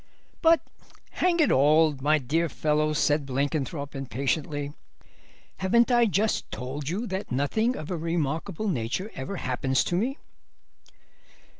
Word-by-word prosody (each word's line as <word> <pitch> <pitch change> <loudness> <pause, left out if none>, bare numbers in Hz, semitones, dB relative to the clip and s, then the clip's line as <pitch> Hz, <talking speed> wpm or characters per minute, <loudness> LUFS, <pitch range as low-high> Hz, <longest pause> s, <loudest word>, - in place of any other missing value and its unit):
'" - - -36
"But 330 0 +5 0.5
hang 355 -1 +1
it 310 - +4
all, 150 +3 +5
my 150 +3 +4
dear 160 +5 0
fellow," 155 0 +1
said 150 0 +2
Blenkinthrope 140 +1 -2
impatiently, 140 +2 -2 0.8
"haven't 235 +6 +3
I 240 -1 +5
just 210 +3 0
told 135 +3 -5
you 200 +8 -2
that 190 -2 -4
nothing 220 - +1
of 155 +4 -6
a 175 - -1
remarkable 165 +4 -2
nature 140 - -2
ever 135 +9 -5
happens 130 -3 0
to 175 - -2
me?" 250 - 0
155 Hz, 135 wpm, -26 LUFS, 140-195 Hz, 0.8 s, But